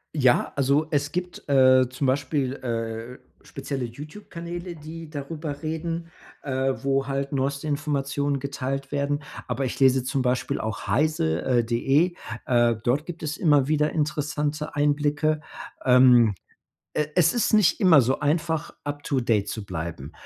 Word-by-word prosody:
Ja. 130 -5 +3
Also, 140 +3 +2
es 145 -1 0
gibt, 180 0 -5
äh, 130 -2 +6
zum 130 +2 -2
Beispiel, 135 0 0
äh, 115 0 -4 0.2
spezielle 135 -2 -5
YouTube-Kanäle, 170 - -8
die 160 +1 -9
darüber 145 0 -6
reden, 165 +1 -4 0.3
äh, 135 -1 0
wo 135 -1 +1
halt 140 0 -2
neueste 140 +2 -1
Informationen 140 -1 -1
geteilt 135 0 -4
werden. 145 0 -1 0.2
Aber 135 - -1
ich 125 0 -4
lese 130 -1 +4
zum 135 +1 -1
Beispiel 125 0 0
auch 110 -3 -4
heise 100 - +1
äh, 120 -2 +1
de. 135 +9 +2 0.3
Äh, 120 -2 +3
dort 140 +6 +1
gibt 175 -2 -7
es 155 0 -3
immer 145 -5 +3
wieder 150 0 +2
interessante 150 0 -2
Einblicke. 145 +1 +1 0.4
Ähm, 125 -4 +6 0.6
e 150 - +1
es 170 -2 +4
ist 240 - +1
nicht 215 -5 +4
immer 180 -7 +7
so 130 +3 0
einfach, 160 +1 0
up 145 0 -4
to 135 -3 0
date 110 -4 +1
zu 110 - -5
bleiben. 85 -5 -6
140 Hz, 150 wpm, -25 LUFS, 130-155 Hz, 0.6 s, immer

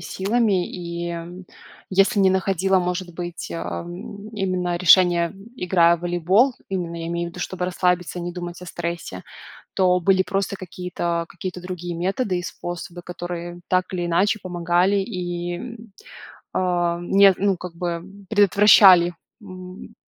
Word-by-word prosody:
силами. 195 0 0
И 170 -1 -5 0.7
если 195 +2 +3
не 190 -1 +5
находила, 190 0 +2
может 180 0 -3
быть, 175 - -6
а, 85 +1 -4 0.5
именно 185 -3 -1
решения, 175 0 +5 0.2
играя 170 -2 +3
в - - -16
волейбол, 180 +9 +2
именно 175 -3 -3
я 165 - -4
имею 170 0 -2
в - - -10
виду, 180 - -9
чтобы 180 0 -3
расслабиться 180 -1 0
и - - -4
не 175 0 -4
думать 175 0 -7
о - - -9
стрессе. 170 0 -5 0.5
То 180 -1 +3
были 190 +1 +3
просто 195 0 -2
какие-то 175 -2 -3
какие-то 180 -1 -6
другие 175 -1 -6
методы 190 +2 -1
и 175 - -4
способы, 175 -1 -6
которые 175 0 -6
так 185 0 +2
или 175 -1 -2
иначе 195 +6 +2
помогали 175 +2 +1
и, 175 +4 -4 0.8
а, 175 -2 0
не 195 +1 +5
ну 195 -1 +1
как 180 -2 -8
бы, 170 -1 -3 0.3
предотвращали, 200 -3 +7 0.3
м. 185 +2 -10
180 Hz, 140 wpm, -22 LUFS, 175-190 Hz, 0.8 s, предотвращали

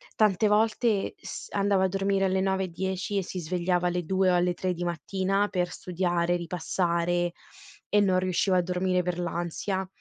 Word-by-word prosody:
tante 215 -1 +3
volte 215 0 +2
s - - -7
andava 200 -1 +2
a - - +3
dormire 195 +1 +1
alle 190 0 +1
9 190 0 +1
e - - -5
10 190 +3 -3
e 195 - +1
si 180 - -5
svegliava 180 +1 0
alle 175 0 -1
2 190 +2 +2
o - - +3
alle 175 0 +2
3 185 +1 -2
di 175 - -5
mattina 190 +4 0
per 180 -1 -1
studiare, 175 -1 0
ripassare 175 0 0 0.6
e 210 - +4
non 185 -2 +3
riusciva 185 0 +1
a - - +4
dormire 180 +1 0
per 180 -1 -2
l'ansia. 175 +2 -2
185 Hz, 180 wpm, -27 LUFS, 175-195 Hz, 0.6 s, e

